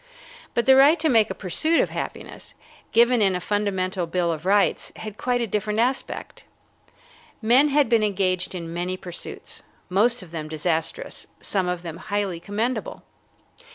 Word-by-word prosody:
But 235 - +1
the 265 - +7
right 285 +5 +6
to 315 0 +2
make 225 -4 +4
a - - -4
pursuit 310 - +2
of - - +1
happiness, - - -7 0.4
given 235 +1 +4
in 195 -2 +3
a - - -1
fundamental 190 -3 -1
bill 170 0 0
of 160 +2 -5
rights, 200 +1 +2
had 215 -2 -7
quite 245 -1 0
a - - +1
different 210 0 -2
aspect. 250 +4 -2 1.0
Men 245 +6 +5
had 290 -1 +3
been 230 -1 +3
engaged 190 -3 0
in 165 -2 -6
many 180 +2 -2
pursuits, 175 -2 -7 0.3
most 220 +4 +2
of 170 - -14
them 155 -2 -5
disastrous, 160 +1 -3
some 190 -3 -1
of 180 -1 -3
them 165 -1 -6
highly 195 -2 -2
commendable. 215 +8 -3
200 Hz, 160 wpm, -24 LUFS, 180-235 Hz, 1.0 s, the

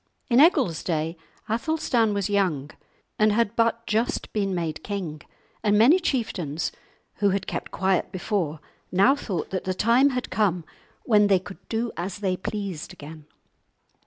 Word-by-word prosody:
In 240 - +6
Egil's 275 - +4
day 165 -1 -1 0.3
Athelstan 235 -1 +1
was 200 -2 0
young 180 -9 0 0.5
and 215 0 +5
had 230 0 +1
but 230 0 +1
just 225 +3 -1
been 195 -3 0
made 160 -3 -3
king, 175 -7 -4 0.4
and 210 -1 +3
many 265 - +6
chieftains, 175 - -2 0.5
who 205 -1 +3
had 195 0 -1
kept - - -4
quiet 190 -1 0
before, 175 -5 -2 0.3
now 200 +9 +5
thought 190 - -4
that 185 - -3
the 185 0 -1
time 235 +8 +4
had 250 -2 -3
come 185 -4 +1 0.4
when 210 -3 +4
they 195 -2 +5
could 190 +2 -9
do 230 +1 -1
as 175 +3 -4
they 190 -3 0
pleased 190 -4 -5
again. 150 +1 -11
200 Hz, 155 wpm, -25 LUFS, 175-230 Hz, 0.5 s, In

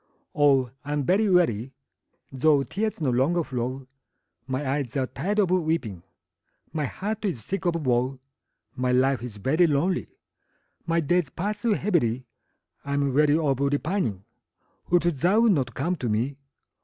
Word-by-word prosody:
Oh, 135 -4 +3
I 145 +1 -4
am 145 -1 0
very 200 +8 +2
weary, 135 - +2 0.6
Though 140 +1 +3
tears 215 +7 -3
no 145 -5 +1
longer 150 +8 +2
flow; 130 0 -4 0.6
My 130 +2 -2
eyes 135 -1 -2
are 130 - +1
tired 180 +12 -3
of 195 -4 +3
weeping, 160 - 0 0.7
My 155 -2 -1
heart 210 - -4
is 170 - -2
sick 195 -1 -2
of 170 - +1
woe; 125 +2 +1 0.6
My 125 0 0
life 130 -1 +2
is 120 -4 -7
very 155 - +3
lonely 165 +5 0 0.8
My 165 0 +2
days 170 0 +1
pass 205 +6 -4
heavily, 170 - +1 0.6
I'm 140 -1 0
weary 150 +2 +4
of 140 -5 0
repining; 140 - -1 0.7
Wilt 175 0 +3
thou 175 - +2
not 185 - +2
come 180 +2 -1
to 125 -5 -3
me? 120 +6 0
145 Hz, 145 wpm, -25 LUFS, 130-175 Hz, 0.8 s, weary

